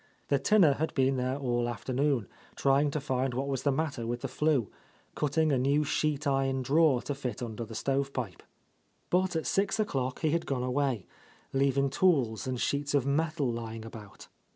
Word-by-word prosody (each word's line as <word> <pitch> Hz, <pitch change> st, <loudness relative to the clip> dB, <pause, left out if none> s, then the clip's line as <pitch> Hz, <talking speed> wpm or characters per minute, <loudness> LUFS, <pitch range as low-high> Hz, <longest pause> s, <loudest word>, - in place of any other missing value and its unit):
The 140 Hz, -, +3 dB
tinner 170 Hz, 0 st, +5 dB
had 160 Hz, +3 st, -3 dB
been 135 Hz, 0 st, +2 dB
there 130 Hz, +1 st, -1 dB
all 120 Hz, -3 st, 0 dB
afternoon, 130 Hz, 0 st, -1 dB, 0.3 s
trying 140 Hz, +2 st, +3 dB
to 150 Hz, -, -2 dB
find 130 Hz, -2 st, -1 dB
what 135 Hz, +2 st, -1 dB
was 135 Hz, -2 st, -1 dB
the 140 Hz, -, +2 dB
matter 135 Hz, -5 st, -2 dB
with 120 Hz, +1 st, -3 dB
the 135 Hz, -, -2 dB
flue, 135 Hz, -3 st, +1 dB, 0.5 s
cutting 155 Hz, +1 st, +1 dB
a 135 Hz, -, +2 dB
new 140 Hz, +4 st, +2 dB
sheet 150 Hz, 0 st, 0 dB
iron 135 Hz, -1 st, +1 dB
drawer 140 Hz, -2 st, +3 dB
to 145 Hz, -, -2 dB
fit 125 Hz, -4 st, -5 dB
under 115 Hz, 0 st, -5 dB
the 110 Hz, 0 st, -9 dB
stove 135 Hz, +4 st, 0 dB
pipe. 115 Hz, -10 st, -5 dB, 0.7 s
But 185 Hz, 0 st, +2 dB
at 160 Hz, -, -1 dB
six 200 Hz, +3 st, +1 dB
o'clock 130 Hz, -11 st, -1 dB
he 155 Hz, -, +2 dB
had 170 Hz, +1 st, -1 dB
gone 130 Hz, -3 st, -1 dB
away, 125 Hz, -4 st, 0 dB, 0.5 s
leaving 135 Hz, 0 st, +2 dB
tools 135 Hz, -10 st, +2 dB
and 130 Hz, -1 st, -2 dB
sheets 145 Hz, +2 st, 0 dB
of 135 Hz, -3 st, +2 dB
metal 150 Hz, -1 st, 0 dB
lying 115 Hz, -1 st, -6 dB
about. 110 Hz, -3 st, -11 dB
135 Hz, 185 wpm, -30 LUFS, 125-145 Hz, 0.7 s, tinner